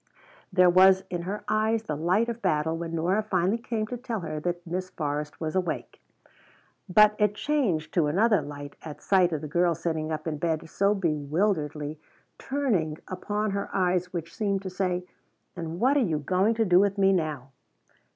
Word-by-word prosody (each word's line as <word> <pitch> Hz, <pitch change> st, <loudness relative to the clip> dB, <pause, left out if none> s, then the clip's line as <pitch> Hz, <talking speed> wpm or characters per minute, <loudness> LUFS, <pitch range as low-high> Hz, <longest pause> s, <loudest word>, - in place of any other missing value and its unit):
There 180 Hz, -1 st, +5 dB
was 190 Hz, +1 st, +6 dB
in 175 Hz, -1 st, -2 dB
her 205 Hz, +1 st, -4 dB
eyes 220 Hz, +1 st, +1 dB
the 150 Hz, -, -3 dB
light 180 Hz, +9 st, +1 dB
of 235 Hz, 0 st, -4 dB
battle 155 Hz, -1 st, +1 dB
when 165 Hz, 0 st, -4 dB
Nora 180 Hz, +6 st, +1 dB
finally 195 Hz, +1 st, 0 dB
came 225 Hz, -2 st, -2 dB
to 245 Hz, +3 st, -5 dB
tell 235 Hz, -4 st, -4 dB
her 155 Hz, -2 st, -4 dB
that 175 Hz, +2 st, -3 dB
Miss 185 Hz, +2 st, -4 dB
Forrest 150 Hz, -1 st, -4 dB
was 160 Hz, +1 st, -3 dB
awake. 185 Hz, -1 st, -3 dB, 0.9 s
But 210 Hz, +3 st, +6 dB
it 210 Hz, -1 st, +2 dB
changed 210 Hz, -, 0 dB
to 165 Hz, -4 st, +2 dB
another 205 Hz, +7 st, +3 dB
light 145 Hz, -1 st, -8 dB
at 155 Hz, -2 st, -9 dB
sight 185 Hz, -3 st, +3 dB
of 155 Hz, -3 st, -2 dB
the 155 Hz, -, -5 dB
girl 175 Hz, +2 st, +2 dB
sitting 160 Hz, -1 st, -2 dB
up 155 Hz, -1 st, -4 dB
in 155 Hz, -3 st, -3 dB
bed 160 Hz, 0 st, -1 dB
so 200 Hz, +4 st, +1 dB
bewilderedly, 155 Hz, -2 st, -1 dB, 0.4 s
turning 210 Hz, -, -1 dB
upon 205 Hz, +3 st, -2 dB
her 200 Hz, 0 st, -3 dB
eyes 180 Hz, -1 st, +1 dB
which 170 Hz, -2 st, -6 dB
seemed 200 Hz, -2 st, -1 dB
to 190 Hz, -, -5 dB
say 180 Hz, -1 st, -1 dB, 0.5 s
"And 170 Hz, -1 st, -5 dB
what 260 Hz, +5 st, +3 dB
are -, -, +5 dB
you 175 Hz, -, +1 dB
going 185 Hz, +9 st, +1 dB
to 225 Hz, 0 st, +1 dB
do 180 Hz, -2 st, +5 dB
with 200 Hz, 0 st, +2 dB
me 195 Hz, 0 st, +4 dB
now?" 150 Hz, -7 st, -2 dB
180 Hz, 185 wpm, -27 LUFS, 160-205 Hz, 0.9 s, was